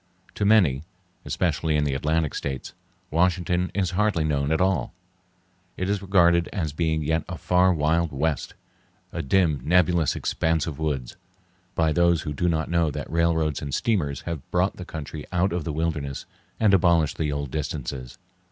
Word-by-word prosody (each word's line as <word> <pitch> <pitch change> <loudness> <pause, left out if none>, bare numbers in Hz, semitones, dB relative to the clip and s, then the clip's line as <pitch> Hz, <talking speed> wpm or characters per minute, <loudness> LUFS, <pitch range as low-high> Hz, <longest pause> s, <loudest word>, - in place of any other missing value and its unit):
To 105 - -1
many, 90 -11 +4 0.4
especially 80 -2 0
in 75 - +2
the 70 -2 0
Atlantic 75 +2 0
States, 70 -2 -4 0.4
Washington 90 +1 +1
is 95 -3 0
hardly 95 -3 +1
known 70 -1 0
at 80 - +2
all. 90 -5 0 0.8
It 95 - -2
is 100 -1 0
regarded 85 -3 +3
as 80 -8 -3
being 80 -1 0
yet 80 +2 0
a - - -5
far 90 +1 +3
wild 80 0 +1
west—a 70 +2 -5
dim, 80 -1 +2
nebulous 85 -2 +3
expanse 80 -2 0
of 80 -3 -6
woods—by 85 +4 -4
those 85 -1 +3
who 75 - -4
do 90 +5 0
not 80 -1 0
know 85 -2 +1
that 70 - -6
railroads 80 -2 +1
and 70 -3 -3
steamers 85 -12 0
have 85 -5 -6
brought 90 +2 +1
the 90 - -7
country 80 -2 -7
out 90 0 +1
of 85 -4 -2
the 80 - -2
wilderness 75 -3 -3 0.3
and 105 -3 +4
abolished 85 -5 +3
the 75 -2 0
old 70 -2 -3
distances. 65 -4 -4
80 Hz, 160 wpm, -25 LUFS, 75-90 Hz, 0.8 s, many